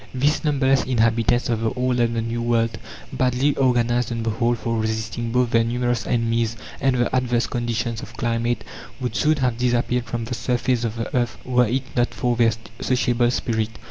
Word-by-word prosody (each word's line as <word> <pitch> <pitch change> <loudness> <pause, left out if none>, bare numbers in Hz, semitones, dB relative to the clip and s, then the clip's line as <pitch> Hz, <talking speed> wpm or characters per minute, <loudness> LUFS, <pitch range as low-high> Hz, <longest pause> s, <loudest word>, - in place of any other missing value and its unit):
These 145 +6 +1
numberless 135 -3 +2
inhabitants 115 -1 +2
of 115 -2 -1
the 115 - +1
Old 125 -1 0
and 115 -1 +1
the 115 - 0
New 115 +1 -3
World, 115 -1 0 0.3
badly 130 +3 +1
organized 120 -2 +2
on 115 -1 -2
the 115 - 0
whole 120 +2 +1
for 115 0 -2
resisting 110 +1 -2
both 125 -1 +1
their 115 0 +4
numerous 120 +1 -1
enemies 115 -1 0 0.2
and 135 -1 +2
the 120 +1 +1
adverse 125 -2 +1
conditions 115 -1 -2
of 115 - -11
climate, 115 -1 -1 0.4
would 125 -2 -3
soon 155 +1 +3
have 125 -3 0
disappeared 125 0 +1
from 120 -2 -4
the 125 - -4
surface 125 0 0
of 115 -1 -2
the 115 +1 -4
earth 120 -2 0
were 125 -1 +3
it 130 +4 0
not 120 0 +1
for 125 -2 0
their 115 -1 +4 0.3
sociable 120 -1 +1
spirit. 110 -3 -1
120 Hz, 190 wpm, -22 LUFS, 115-125 Hz, 0.4 s, their